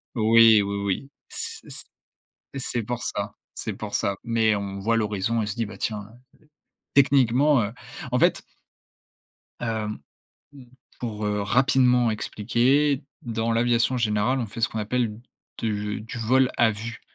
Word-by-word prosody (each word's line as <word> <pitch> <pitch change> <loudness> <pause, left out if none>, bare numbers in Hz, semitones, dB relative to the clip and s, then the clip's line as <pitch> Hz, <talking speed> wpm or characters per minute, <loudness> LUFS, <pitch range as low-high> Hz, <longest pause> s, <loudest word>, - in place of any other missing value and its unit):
oui, 115 -1 +6
oui, 100 0 -3
oui, 100 +8 -2 0.2
c - - -6
c - - -4 0.7
c'est 120 -3 -2
pour 120 +2 -4
ça - - -3 0.2
c'est - - -4
pour - - -7
ça. 100 - 0
Mais 115 -2 +2
on 100 -1 -4
voit 115 +4 +1
l'horizon 105 +1 0
et - - -1
se 105 - -3
dit, 115 -1 -1
bah 110 - -9
tiens, 105 -2 -3
heu, 110 +4 -16 0.8
techniquement, 135 0 +4
heu, 105 - -3 0.4
en 125 - +2
fait - - +3 1.2
hem, 110 -2 -2 0.5
mmh, 140 -3 -13 0.4
pour, 110 -3 -4
heu, 105 0 0
rapidement 125 +1 +3
expliquer. 125 +7 +1 0.2
Dans 115 -1 -1
l'aviation 120 +2 +2
générale, 115 +2 +1
on 120 - -2
fait 110 +2 -8
ce 115 - +2
qu'on 110 - -5
appelle 115 +2 0 0.5
de 105 -2 -2
du 105 - -11 0.2
«vol 130 0 +4
à 115 -2 +4
vue», 110 +2 -6
115 Hz, 155 wpm, -25 LUFS, 105-125 Hz, 1.2 s, oui